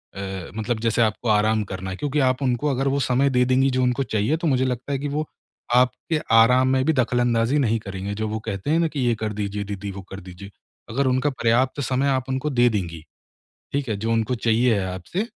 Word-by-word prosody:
अ, 95 -3 -6
मतलब 110 +1 -2
जैसे 115 0 +1
आपको 110 +1 0
आराम 110 0 +3
करना 95 -1 -6
है - - -4
क्योंकि 145 +4 -1
आप 130 +2 -2
उनको 130 +3 0
अगर 135 0 0
वो 140 +1 0
समय 130 +2 +2
दे 125 -1 +3
देंगी 130 +2 +3
जो - - +2
उनको 125 +2 +1
चाहिए 110 +5 0
तो 165 - -2
मुझे 130 -3 +2
लगता 125 +2 -3
है 135 - -1
कि 145 - -3
वो 150 +2 -2 0.5
आपके 125 +5 +1 0.2
आराम 125 +3 +5
में 130 0 +2
भी 160 - +3
दख़लअंदाज़ी 120 0 +1
नहीं 115 -4 +1
करेंगे, 100 -1 -5
जो 110 +1 -2
वो 110 +1 -3
कहते 100 +7 -3
हैं 165 - +3
ना 170 - +2
कि 150 - -5
ये 120 -2 +2
कर 110 -1 -3
दीजिए 100 0 -3
दीदी, 100 0 -5
वो 95 0 -8
कर 95 - -6
दीजिए। 95 +2 -11 0.4
अगर 135 +4 0
उनका 130 +3 +2
पर्याप्त 130 +2 +1
समय 130 +1 0
आप 130 -1 -1
उनको 130 +3 -1
दे 120 -3 +3
देंगी। 85 -7 -3 0.7
ठीक 140 -2 -2
है? 110 - -1
जो 110 +3 -2
उनको 115 +2 0
चाहिए 115 +1 +2
है 95 - -2
आपसे, 95 - -3
120 Hz, 230 wpm, -23 LUFS, 105-130 Hz, 0.7 s, आराम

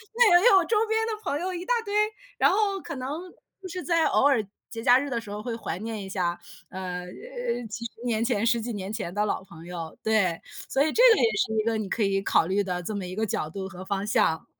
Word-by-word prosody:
那 425 -8 +7
也 435 - +4
有 390 -5 +6
周 450 - +1
边 445 0 +1
的 450 - -1
朋 295 -6 -1
友 370 +1 -2
一 350 - -4
大 - - +2
堆， 405 - -4 0.4
然 - - +5
后 400 0 +1
可 - - -6
能 260 0 -4 0.5
就 375 - -7
是 360 +1 -5
在 335 -2 +2
偶 - - +3
尔 265 -6 +3 0.3
节 225 - -6
假 245 +2 +6
日 285 - -3
的 235 -2 -2
时 220 - -11
候， 210 +1 -5
会 235 -1 -3
怀 225 -7 -4
念 220 -1 -5
一 190 - -8
下， 175 -3 -1 0.3
呃， 180 -1 -5
诶， 480 - -5
几 235 +2 -5
十 235 - -5
年 230 -2 +1
前 230 -4 +1
10 235 0 +3
几 235 +1 -4
年 195 -1 -5
前 205 -6 -4
的 210 +1 +1
老 205 - -2
朋 170 -3 -13
友。 170 -2 -6
对， 200 -6 +2 0.3
所 270 - +1
以 310 - +1
这 485 - +4
个 - - +1
也 - - +3
是 220 - +1
一 - - -4
个， 225 0 0
你 215 -2 -3
可 230 - -2
以 195 -1 +1
考 165 - +3
虑 195 +3 +1
的 180 -2 -3
这 210 +4 -4
么 195 - -3
一 180 +1 -6
个 220 - -1
角 175 - -2
度 190 +3 -5
和 185 0 -9
方 195 +1 -2
向。 160 -6 +1
220 Hz, 280 characters per minute, -26 LUFS, 190-310 Hz, 0.5 s, 那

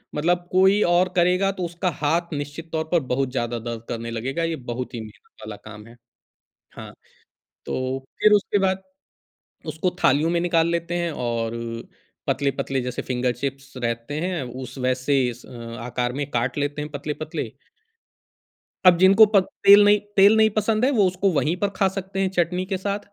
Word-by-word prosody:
मतलब 175 +3 0
कोई 190 +3 +4
और 180 +1 +3
करेगा 180 +2 +3
तो 190 -2 -5
उसका 170 +2 -2
हाथ 165 +3 0
निश्चित 145 +3 -6
तौर 160 -1 -1
पर 175 - +4
बहुत 130 0 0
ज़्यादा 120 -2 -2
दर्द 115 0 -6
करने 115 0 -4
लगेगा, 135 +8 -3
ये 165 -1 -1 0.2
बहुत 125 +1 -5
ही 115 - -4
मेहनत 110 -1 -14
वाला 110 -1 -7
काम 105 0 -12
है। 115 - -15 0.8
हाँ। - - -9 0.7
तो 130 +1 -2 0.2
फिर 210 - +5
उसके 205 0 +3
बाद 190 0 0 0.8
उसको 170 +3 -1
थालियों 150 +5 +3
में 170 - +1
निकाल 170 -2 +2
लेते 170 0 -2
हैं 170 -1 -1 0.2
और 115 -1 -2
अ, 115 0 -5 0.4
पतले-पतले 135 -1 -1
जैसे 125 0 -4
फ़िंगर 125 -1 -1
चिप्स 135 +2 -6
रहते 120 +4 -3
हैं 180 -3 -2 0.2
उस 130 - -9
वैसे 130 +1 +1
अस 120 +1 -12
अ, - - -15 0.3
आकार 125 0 -2
में 140 +1 -4
काट 120 +4 -1
लेते 145 +1 -2
हैं 150 - -6
पतले-पतले। 150 +2 -5 1.3
अब 175 -1 +8
जिनको 195 +4 +7
पत 190 -2 +6 0.2
तेल 205 +1 +9
नहीं 205 0 +5 0.2
तेल 200 +3 +7
नहीं 220 0 +5
पसंद 215 +2 +1
है 270 - +3
वो 215 -8 +3
उसको 185 +2 0
वहीं 160 +3 +1
पर 200 +2 0
खा 195 -1 +3
सकते 195 0 -4
हैं 190 - +2
चटनी 180 +2 +1
के 190 0 -2
साथ 200 +2 -2
160 Hz, 180 wpm, -23 LUFS, 125-185 Hz, 1.3 s, तेल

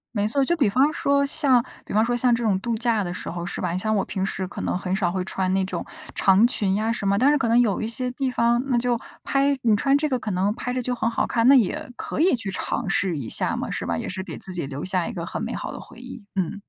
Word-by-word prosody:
没 205 0 +1
错， 270 +4 +1
就 345 - +2
比 265 -10 +2
方 275 +8 +3
说 280 -2 +2
像 275 -5 +3 0.2
比 - - -11
方 215 +2 +3
说 245 0 0
像 245 -1 +3
这 235 - -3
种 195 -4 +2
度 235 +2 -2
假 230 -3 +1
的 175 - -4
时 180 - -7
候 170 0 -5
是 - - -5
吧？ - - -1
你 180 - -2
像 215 +2 0
我 195 - +1
平 190 - -3
时 190 -1 -2
可 - - -7
能 - - -1
很 185 0 -2
少 180 -4 0
会 185 -1 -2
穿 185 -1 -1
那 190 -1 +1
种 - - -4 0.3
长 195 +4 +5
裙 200 -5 +1
呀 220 +2 0
什 200 -4 -3
么， 200 0 +3
但 270 +5 +4
是 295 - +3
可 245 - 0
能 235 +2 +4
有 220 -4 +2
一 220 - -2
些 250 +2 -2
地 265 +1 -2
方， 240 0 +2
那 250 -3 +2
就 240 0 +1 0.3
拍 275 0 +2
你 220 -3 +4
穿 275 +6 +3
这 305 +1 0
个 255 -3 -1
可 215 - -5
能 195 +2 +1
拍 250 +1 -4
着 255 - -1
就 250 - -1
很 230 -1 0
好 - - 0
看， 230 0 +1
那 275 - +8
也 235 +1 +1
可 - - -5
以 360 -5 +4
去 210 -5 -4
尝 185 - -3
试 190 -4 0
一 120 -5 -5
下 - - -1
嘛， - - -4
是 - - -3
吧？ 85 - -1
也 - - -4
是 190 0 -4
给 - - -7
自 185 - -7
己 170 -6 -3
留 140 +3 -5
下 185 -2 0
一 235 - -5
个 170 -3 -4
很 - - -5
美 - - -3
好 - - -5
的 - - -8
回 255 - -13
忆。 250 -4 -10
嗯。 190 +2 -2
225 Hz, 325 characters per minute, -24 LUFS, 190-250 Hz, 0.3 s, 那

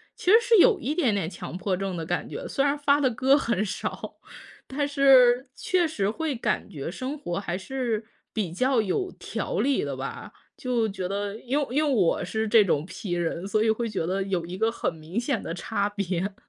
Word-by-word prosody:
其 365 - +1
实 445 - +9
是 470 -2 +4
有 410 0 +6
一 295 +4 -2
点 250 -12 +2
点 175 -5 -1
强 180 - -8
迫 185 -1 -1
症 195 -2 -3
的 165 - -4
感 175 +2 -2
觉。 - - -6
虽 275 - 0
然 285 +1 +2
发 285 0 +3
的 260 -3 +2
歌 265 +5 +4
很 230 -6 0
少， 190 - -5 0.5
但 285 +2 -1
是 265 -3 +5
确 360 -2 +1
实 205 -10 -1
会 310 +3 -2
感 225 -2 -1
觉 145 0 -5
生 260 +10 -4
活 175 -11 -4
还 175 -3 -3
是 230 0 -2 0.3
比 200 -7 -2
较 255 +3 +2
有 290 - -1
条 - - -3
理 275 0 +2
的 140 -2 -3
吧。 140 +10 -6 0.2
就 240 -3 0
觉 190 -2 -5
得， 200 +2 -3
因 265 +5 -1
为 285 - -1
因 305 - +3
为 285 - +1
我 190 -8 +2
是 220 0 -2
这 215 0 +6
种 155 -4 0
P 190 +1 -7
人， 175 +1 -1
所 215 +1 +1
以 220 - +3
会 230 +1 0
觉 195 -6 -2
得 195 +2 -1
有 185 -3 -2
一 180 +2 -6
个 225 +2 +2
很 200 - -2
明 160 +8 -4
显 250 0 -1
的 165 - -4
差 200 +3 -1
别。 195 -1 -2
220 Hz, 235 characters per minute, -26 LUFS, 185-270 Hz, 0.5 s, 实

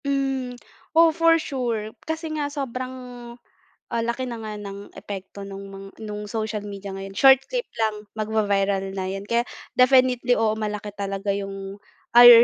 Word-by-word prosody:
Hmm, 270 -3 -1 0.4
oo 330 -1 +7
for 330 0 +5
sure 235 -8 -2 0.2
kasi 320 0 -2
nga 295 -2 -1
sobrang, 255 -3 -3 1.0
ah, 230 - 0
laki 250 +2 -2
na 235 - -4
nga 215 -1 -5
ng 200 0 -8
epekto 195 0 -7
nung 195 0 -7
mga 195 0 -9 0.4
social 215 -1 -2
media 200 -1 -6
ngayon, 195 0 -7
short 270 -1 +8
clip - - -1 0.2
lang 215 -1 0
magvi-viral 200 -3 0
na 190 -1 -2
yun 195 +1 -4
kaya 235 +3 +2 0.3
definitely 255 -1 +5
oo 220 -1 +3
malaki 210 -1 -4
talaga 200 0 -2
yung 195 0 -5 0.3
ay, 240 0 +11
220 Hz, 150 wpm, -24 LUFS, 200-255 Hz, 1.0 s, ay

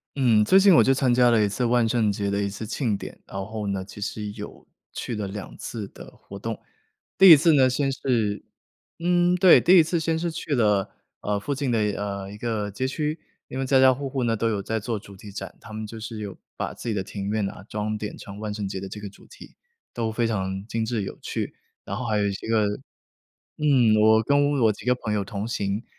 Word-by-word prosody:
嗯， 120 -6 +4
最 190 - +6
近 195 -1 +6
我 - - +7
就 135 - +4
参 130 -2 +2
加 125 0 +5
了 115 -2 +4
一 105 - +2
次 100 +5 -2
万 120 -1 +3
圣 110 -3 +2
节 100 0 -2
的 100 0 0
一 100 - 0
次 100 +3 -6
庆 110 -3 -1
典。 - - -9
然 95 0 -5
后 110 -1 -5
呢， 95 -1 -2
其 105 - -11
实 105 0 -4
有 - - -10 0.3
去 120 - -5
了 105 -2 -3
2 100 0 -7
次 110 -4 -6
的 - - -12
活 100 - -11
动。 115 +2 -4 0.6
第 190 -1 +9
1 160 - +11
次 160 +3 +4
呢， 130 -3 +5
先 135 +2 0
是 110 -7 -1 0.6
嗯， 175 +1 +3
对， 180 0 +7
第 185 +1 +6
1 165 - +8
次 170 +2 -1
先 160 0 0
是 170 +1 -2
去 155 -2 -3
了， 105 -5 +2 0.3
呃， 105 0 -1
附 110 +8 -3
近 135 -2 -2
的， 115 - +2
呃， 100 -2 -2
一 105 - -9
个 105 -2 -2
街 115 +7 -2
区， 150 +3 -2 0.3
因 130 - -6
为 135 - -1
家 135 0 +4
家 130 0 +7
户 135 +1 -5
户 130 -2 -2
呢， 115 -1 +1
都 115 +1 0
有 105 -3 -1
在 110 +2 -2
做 115 +1 -3
主 100 -1 -12
题 100 +2 -11
展， 100 - -7
他 110 - -12
们 110 0 -5
就 110 +1 -9
是 110 0 -6
有 100 -3 -6 0.2
把 - - -4
自 - - -6
己 110 - -1
的 95 - -1
庭 100 +1 -5
院 105 -1 0
啊 95 - -11
装 105 0 -2
点 105 0 -6
成 100 0 -10
万 105 -1 -4
圣 105 -1 -4
节 95 0 -4
的 95 0 -7
这 105 - -7
个 105 - -7
主 100 - -19
题， - - -14 0.4
都 115 -2 -2
非 115 +2 0
常 95 -3 -2
精 115 -1 -2
致 110 -2 -2
有 95 - -7
趣。 - - -4 0.3
然 100 - -4
后 125 +2 -4
还 110 -1 +1
有 105 - +1
一 - - 0
些 100 - -7
个 110 -2 +3 0.9
嗯， 130 -7 +4
我 110 0 +6
跟 145 +3 +3
我 110 - +5
几 100 - -12
个 125 0 +3
朋 110 -3 -3
友 100 -1 0
同 100 +1 -5
行， 105 -1 -2
110 Hz, 260 characters per minute, -25 LUFS, 105-130 Hz, 0.9 s, 1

